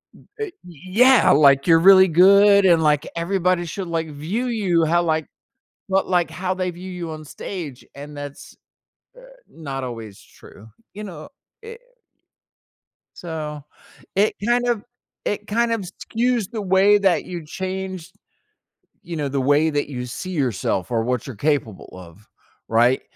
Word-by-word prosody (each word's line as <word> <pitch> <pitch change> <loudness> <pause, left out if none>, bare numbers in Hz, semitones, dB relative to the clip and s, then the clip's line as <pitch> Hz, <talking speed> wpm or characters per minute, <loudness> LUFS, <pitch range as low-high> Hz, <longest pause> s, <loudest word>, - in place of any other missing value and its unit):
M - - -20
uh - - -2
y 400 - -10
yeah, 185 - +3
like, 140 0 +5
you're 165 -1 +6
really 190 +2 +7
good, 200 +4 +6
and, 170 -3 +5
like, 150 -2 +2
everybody 180 0 0
should, 185 +3 -5
like, 165 -1 -3
view 165 - -3
you 190 -8 +1
how, 170 +2 +2
like 160 -2 -1 0.6
but, 195 0 +1
like, 175 -2 +1
how 185 +1 -3
they 185 -1 -2
view 180 +2 -10
you 175 -3 -6
on 155 0 -8
stage, 150 -4 -8
and 145 +1 -10
that's, 145 0 -9 0.6
uh, - - -14 0.3
not 135 -5 -6
always 115 -5 -8
true. 105 - -17 0.3
You 210 - -8
know, 165 -6 -9 0.3
it 460 +1 -10 1.4
So, 155 -4 -6 0.5
it 205 +3 +2
kind 245 +1 +1
of 235 -4 0 0.4
it 210 0 -3
kind 235 +2 0
of 225 - -2
skews 225 +4 -2
the 220 -3 -4
way 195 +2 +4
that 195 -3 +1
you 175 -3 -7
change, 185 0 -5 0.9
you 170 -2 -7
know, 145 -3 -2
the 140 - -2
way 145 +4 +3
that 145 -1 -1
you 125 -3 -5
see 185 +9 -7
yourself, 115 - -2
or 115 -2 +1
what 125 +1 -2
you're 130 - -7
capable 135 -5 -2
of, 90 +3 -14 0.4
right? 120 +3 +3
170 Hz, 160 wpm, -21 LUFS, 145-195 Hz, 1.4 s, really